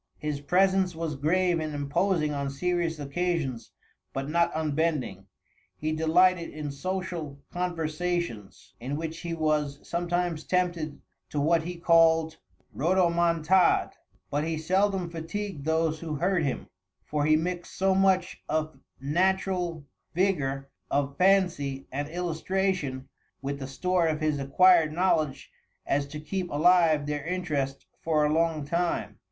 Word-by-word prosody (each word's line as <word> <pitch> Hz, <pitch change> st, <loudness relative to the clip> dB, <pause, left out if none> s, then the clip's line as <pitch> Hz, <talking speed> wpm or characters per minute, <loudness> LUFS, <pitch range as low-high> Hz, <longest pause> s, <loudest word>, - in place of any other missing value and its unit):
"His 150 Hz, -2 st, -3 dB
presence 190 Hz, +2 st, +2 dB
was 165 Hz, -1 st, -3 dB
grave 175 Hz, +4 st, +2 dB
and 155 Hz, -1 st, -3 dB
imposing 150 Hz, +2 st, 0 dB
on 140 Hz, -1 st, -2 dB
serious 170 Hz, +3 st, -1 dB
occasions, 145 Hz, -3 st, -2 dB, 0.4 s
but 135 Hz, 0 st, -3 dB
not 170 Hz, +2 st, +2 dB
unbending. 150 Hz, -, -1 dB, 0.5 s
He 155 Hz, +1 st, -2 dB
delighted 170 Hz, +2 st, +3 dB
in 150 Hz, -2 st, -5 dB
social 170 Hz, -1 st, -4 dB
conversation, 170 Hz, -, -2 dB, 0.3 s
in 135 Hz, +5 st, -3 dB
which 160 Hz, +1 st, -5 dB
he 170 Hz, -1 st, -4 dB
was 150 Hz, -3 st, 0 dB
sometimes 175 Hz, -2 st, -1 dB
tempted 175 Hz, -4 st, -1 dB, 0.3 s
to 150 Hz, -, -2 dB
what 165 Hz, +3 st, +3 dB
he 175 Hz, +2 st, -5 dB
called 165 Hz, -1 st, +4 dB, 0.4 s
rodomontade. 170 Hz, +1 st, +3 dB, 0.4 s
But 145 Hz, +1 st, 0 dB
he 160 Hz, 0 st, -2 dB
seldom 190 Hz, +3 st, +1 dB
fatigued 170 Hz, 0 st, -5 dB
those 160 Hz, 0 st, +1 dB
who 155 Hz, -2 st, -4 dB
heard 180 Hz, +4 st, +1 dB
him; 135 Hz, -3 st, -2 dB, 0.4 s
for 150 Hz, -1 st, -1 dB
he 155 Hz, -, +5 dB
mixed 175 Hz, +2 st, -3 dB
so 190 Hz, 0 st, +3 dB
much 190 Hz, -1 st, +2 dB
of 155 Hz, 0 st, -1 dB, 0.2 s
natural 175 Hz, +1 st, 0 dB, 0.3 s
vigor 140 Hz, -8 st, 0 dB, 0.2 s
of 140 Hz, 0 st, 0 dB
fancy 180 Hz, -8 st, +2 dB
and 145 Hz, +2 st, -3 dB
illustration 175 Hz, -4 st, -2 dB, 0.4 s
with 140 Hz, +1 st, -3 dB
the 135 Hz, -, -5 dB
store 180 Hz, +5 st, +1 dB
of 155 Hz, -1 st, 0 dB
his 155 Hz, -2 st, 0 dB
acquired 160 Hz, +3 st, +5 dB
knowledge, 155 Hz, -6 st, 0 dB, 0.3 s
as 140 Hz, 0 st, 0 dB
to 150 Hz, +2 st, -7 dB
keep 175 Hz, +4 st, -3 dB
alive 160 Hz, -1 st, +4 dB
their 145 Hz, -1 st, -3 dB
interest 150 Hz, -6 st, -2 dB, 0.2 s
for 155 Hz, -2 st, +2 dB
a 150 Hz, -, +1 dB
long 160 Hz, -2 st, +1 dB
time." 170 Hz, +3 st, -1 dB
160 Hz, 135 wpm, -27 LUFS, 145-180 Hz, 0.5 s, he